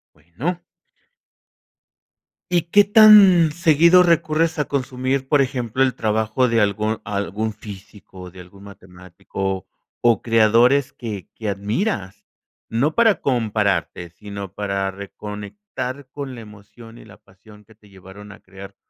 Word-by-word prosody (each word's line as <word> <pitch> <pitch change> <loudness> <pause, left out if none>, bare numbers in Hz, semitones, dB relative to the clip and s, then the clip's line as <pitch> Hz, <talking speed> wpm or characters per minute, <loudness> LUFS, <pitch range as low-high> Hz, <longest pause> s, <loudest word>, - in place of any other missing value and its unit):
Bueno. 85 - -5 2.0
¿Y 175 -2 +2
qué 200 +5 +4
tan 200 -6 +6
seguido 170 +3 +4
recurres 165 -1 +1
a 150 - 0
consumir, 130 0 -3
por 145 0 +3
ejemplo, 130 -2 -3
el 130 -2 +2
trabajo 110 +2 0
de 115 -1 +1
algún 105 +2 -1
algún 105 +2 -4
físico, 100 -3 -12
de 90 0 -12
algún 95 +2 -16
matemático 95 0 -7 0.4
o 120 -2 +2
creadores 115 +4 +3
que 105 -6 -8
que 110 -2 -5
admiras? 100 - -3 0.4
No 135 +8 -1
para 225 -7 +3
compararte, 105 -8 -1
sino 100 +1 -9
para 100 -1 -3
reconectar 105 - -8
con 140 -3 -7
la 115 - -10
emoción 110 +2 -15
y - - -15
la 105 -1 -16
pasión 105 +2 -20
que 110 - -21
te 105 -1 -23
llevaron 95 +2 -14
a 100 - -14
crear 95 +1 -13
110 Hz, 130 wpm, -20 LUFS, 100-140 Hz, 2.0 s, tan